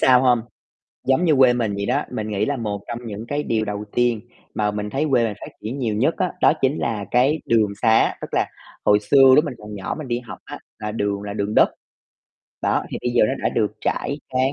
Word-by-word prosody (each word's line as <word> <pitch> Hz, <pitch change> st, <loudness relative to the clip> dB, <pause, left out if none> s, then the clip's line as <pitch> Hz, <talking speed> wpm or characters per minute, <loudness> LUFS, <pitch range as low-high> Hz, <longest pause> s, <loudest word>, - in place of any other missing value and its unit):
sao 125 Hz, -1 st, +6 dB
hông? 125 Hz, -3 st, +3 dB, 0.7 s
Giống 135 Hz, +6 st, +3 dB
như 155 Hz, -4 st, +4 dB
quê 130 Hz, -2 st, +6 dB
mình 115 Hz, -4 st, -1 dB
vậy 100 Hz, 0 st, -2 dB
đó, 135 Hz, +4 st, +1 dB
mình 110 Hz, -4 st, -3 dB
nghĩ 100 Hz, -1 st, 0 dB
là 145 Hz, -, -1 dB
một 105 Hz, -3 st, -3 dB
trong 120 Hz, 0 st, -4 dB
những 110 Hz, 0 st, -6 dB
cái 145 Hz, +1 st, -2 dB
điều 110 Hz, -1 st, 0 dB
đầu 105 Hz, 0 st, -4 dB
tiên 120 Hz, -3 st, +2 dB, 0.3 s
mà 105 Hz, -1 st, +1 dB
mình 105 Hz, 0 st, -4 dB
thấy 140 Hz, +7 st, -1 dB
quê 120 Hz, -3 st, +3 dB
mình 110 Hz, -, -2 dB
phát -, -, -8 dB
triển 115 Hz, +6 st, -5 dB
nhiều 110 Hz, -4 st, -1 dB
nhất 135 Hz, +9 st, +1 dB
á, 180 Hz, -, 0 dB
đó -, -, +6 dB
chính 135 Hz, +3 st, +2 dB
là 105 Hz, -4 st, -2 dB
cái 135 Hz, +6 st, +3 dB
đường 110 Hz, -3 st, +3 dB
sá. 110 Hz, -1 st, +4 dB
Tức -, -, -5 dB
là -, -, +2 dB, 0.4 s
hồi 105 Hz, 0 st, +5 dB
xưa 135 Hz, +5 st, +6 dB
lúc 150 Hz, -, +4 dB
mình 140 Hz, -, -4 dB
còn 105 Hz, 0 st, -9 dB
nhỏ 95 Hz, -, -4 dB
mình 155 Hz, -4 st, -6 dB
đi 120 Hz, 0 st, -1 dB
học 120 Hz, -5 st, -10 dB
á, -, -, -7 dB, 0.2 s
là 105 Hz, 0 st, -4 dB
đường 100 Hz, -2 st, -2 dB
là 100 Hz, -, -5 dB
đường 105 Hz, +1 st, -2 dB
đất, -, -, +6 dB, 0.9 s
đó, -, -, +1 dB
thì -, -, -3 dB
bây 125 Hz, -, 0 dB
giờ 120 Hz, -, +4 dB
nó -, -, 0 dB
đã -, -, +4 dB
được 105 Hz, -2 st, 0 dB
trải, 140 Hz, -, -1 dB
cán 130 Hz, +1 st, +1 dB
115 Hz, 250 wpm, -22 LUFS, 105-130 Hz, 0.9 s, sao